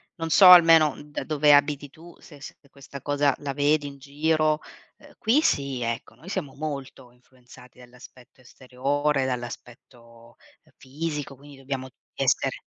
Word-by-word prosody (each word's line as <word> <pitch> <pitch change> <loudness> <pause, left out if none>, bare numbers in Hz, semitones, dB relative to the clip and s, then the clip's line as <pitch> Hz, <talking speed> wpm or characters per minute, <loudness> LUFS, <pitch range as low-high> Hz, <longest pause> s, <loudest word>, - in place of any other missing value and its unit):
Non 165 -1 -5
so, 190 - +7
almeno 165 -3 +7
da 150 - -6
dove 150 -1 +3
abiti 145 0 +1
tu, 170 +3 -16
se 145 -3 -16
se - - -10 0.2
questa 140 0 -12
cosa 145 -1 +1
la 140 -1 -5
vedi 145 +1 +1
in 140 -1 -11
giro; 155 +2 0 0.4
ehm, - - -19
qui 235 +7 +2
sì, 140 - -1
ecco, 115 0 -5
noi 175 - -14
siamo 165 -9 -5
molto 140 -4 -7
influenzati 125 0 -20
dall'aspetto 125 +1 -17
esteriore, 135 +3 -2
dall'aspetto, 120 -1 -9 0.3
ehm, - - -29
fisico, 145 0 -6
quindi 140 +1 -16
dobbiamo 135 -1 -6 0.3
essere - - 0
140 Hz, 145 wpm, -24 LUFS, 130-150 Hz, 0.4 s, so